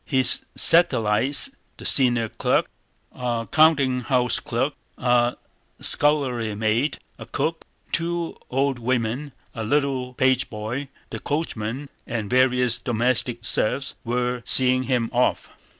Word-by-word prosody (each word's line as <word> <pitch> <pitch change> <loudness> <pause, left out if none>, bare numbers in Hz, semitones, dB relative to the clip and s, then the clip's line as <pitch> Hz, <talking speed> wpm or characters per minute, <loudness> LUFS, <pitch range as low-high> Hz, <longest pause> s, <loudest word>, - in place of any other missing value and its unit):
His 130 -3 +1
satellites—the 140 - +2
senior 120 -4 +3
clerk, - - 0 0.4
a 120 -2 -3
countinghouse 130 -5 +3
clerk, - - -1 0.2
a 120 -1 +2 0.4
scullery 130 -7 +2
maid, 110 +7 0 0.2
a - - -9
cook, 165 0 -2 0.3
two 170 0 -2
old 135 0 0
women, 125 +3 -2 0.2
a 115 - -5
little 130 0 -1
pageboy, 130 0 -1 0.2
the - - -5
coachman, 140 -3 -3 0.2
and 110 -3 -4
various 125 -2 +3
domestic 120 0 0
serfs—were 125 +1 -2
seeing 130 +1 +3
him 125 -3 0
off. 125 +1 0
125 Hz, 105 wpm, -23 LUFS, 115-140 Hz, 0.4 s, senior